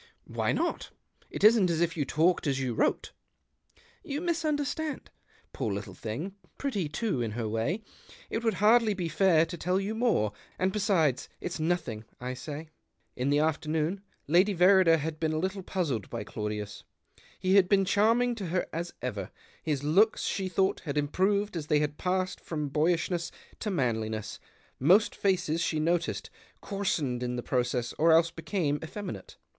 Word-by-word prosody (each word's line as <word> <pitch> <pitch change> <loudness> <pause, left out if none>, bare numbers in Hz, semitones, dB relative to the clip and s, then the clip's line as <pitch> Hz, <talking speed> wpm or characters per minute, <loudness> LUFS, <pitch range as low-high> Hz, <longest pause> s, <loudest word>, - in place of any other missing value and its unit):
"Why - - -1
not? - - -1 0.4
It - - -6
isn't 215 -4 +6
as 165 -2 0
if 170 -1 +1
you 150 -4 -1
talked 160 +4 +2
as 135 -1 +1
you 130 -3 -1
wrote." - - 0 0.5
" 470 0 -32
You 290 - -1
misunderstand. 310 -3 -2 0.4
Poor 110 - -2
little 100 0 -5
thing 115 - -5
— - - -37
pretty 205 - -2
too, 170 - -1
in 110 -3 -2
her 115 -1 -2
way! 115 - -1 0.4
It 225 - -3
would 225 -1 +1
hardly 220 0 +4
be 180 -3 -2
fair 165 0 +4
to 175 +1 -7
tell 180 +3 +1
you 200 +2 -2
more; 220 - +1 0.3
and 185 +1 0
l^esides, 185 - +1
it's 175 - -5
nothing, 155 -10 -1 0.2
I 125 +1 -4
say." 150 +4 -7 0.5
In 130 +2 -1
the 145 - +3
afternoon 155 +4 0 0.3
Lady 185 +6 +4
Verrider 180 -2 +6
had 155 0 -4
been 160 -1 0
a - - 0
little 190 +4 -2
puzzled 160 - -2
by - - -4
Claudius. 105 -1 -5 0.5
He 185 0 +1
had 195 -2 +5
been 195 -1 +4
charming 230 +5 +3
to 205 -6 -5
her 180 +2 0
as 170 +2 -4
ever; 100 -7 -3 0.3
his 145 -3 -2
looks, 195 +9 +3
she 190 -2 -1
thought, 190 +2 +1
had 150 -2 -4
improved 195 +7 +1
as 155 -3 -4
they 150 - +3
had 150 0 -1
passed 185 0 -1
from 150 -3 -3
boyishness 165 +3 +1 0.3
to 215 - -2
manliness 110 - -2 0.2
— - - -34
most 185 +10 +5
faces, 175 -4 +1
she 155 -2 0
noticed, 170 +2 -1 0.3
coarsened 160 - -1
in 125 0 -2
the 120 - -4
process, 125 -1 -1
or 165 +2 +5
else 165 +1 +5
became 165 -3 -1
effeminate. 160 - -7
165 Hz, 170 wpm, -29 LUFS, 145-195 Hz, 0.5 s, isn't